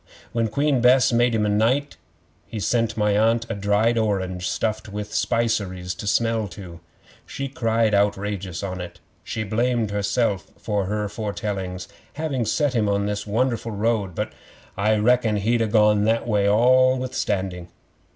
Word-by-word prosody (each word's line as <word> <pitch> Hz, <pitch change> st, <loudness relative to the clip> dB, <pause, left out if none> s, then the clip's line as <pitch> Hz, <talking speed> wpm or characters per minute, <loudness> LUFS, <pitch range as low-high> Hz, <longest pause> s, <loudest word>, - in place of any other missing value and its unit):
When 115 Hz, -1 st, 0 dB
Queen 140 Hz, +3 st, +1 dB
Bess 125 Hz, 0 st, +5 dB
made 120 Hz, 0 st, +3 dB
him 105 Hz, -1 st, +1 dB
knight, 135 Hz, +6 st, +1 dB, 0.5 s
he 110 Hz, -, -6 dB
sent 115 Hz, +1 st, 0 dB
my 105 Hz, -1 st, +2 dB
Aunt 115 Hz, +2 st, +2 dB
a -, -, 0 dB
dried 105 Hz, +3 st, +1 dB
orange 95 Hz, -4 st, -1 dB
stuffed 110 Hz, 0 st, -2 dB
with 105 Hz, +1 st, -6 dB
spiceries 100 Hz, -7 st, -1 dB
to 105 Hz, -, -7 dB
smell 115 Hz, 0 st, +1 dB
to. 85 Hz, -2 st, -10 dB, 0.5 s
She 140 Hz, -, -4 dB
cried 115 Hz, -4 st, 0 dB
outrageous 100 Hz, -3 st, -1 dB
on 95 Hz, -2 st, -4 dB
it. 90 Hz, -1 st, -9 dB, 0.2 s
She 110 Hz, -, -4 dB
blamed 115 Hz, +1 st, 0 dB
herself 100 Hz, 0 st, 0 dB
for 105 Hz, -3 st, -2 dB
her 105 Hz, +2 st, -2 dB
foretellings, 100 Hz, -3 st, -4 dB, 0.3 s
having 140 Hz, -6 st, -2 dB
set 145 Hz, +4 st, +1 dB
him 110 Hz, -4 st, +1 dB
on 100 Hz, 0 st, +1 dB
his 105 Hz, 0 st, -3 dB
won'erful 115 Hz, +1 st, -1 dB
road; 105 Hz, -4 st, 0 dB
but -, -, -3 dB, 0.4 s
I 105 Hz, +2 st, +2 dB
reckon 115 Hz, 0 st, +2 dB
he'd 115 Hz, +3 st, +1 dB
ha' 110 Hz, -, 0 dB
gone 105 Hz, -1 st, +4 dB
that 115 Hz, +2 st, +1 dB
way 100 Hz, -3 st, +2 dB
all 130 Hz, +4 st, +4 dB
withstanding. 95 Hz, -8 st, -3 dB
105 Hz, 155 wpm, -23 LUFS, 100-115 Hz, 0.5 s, Bess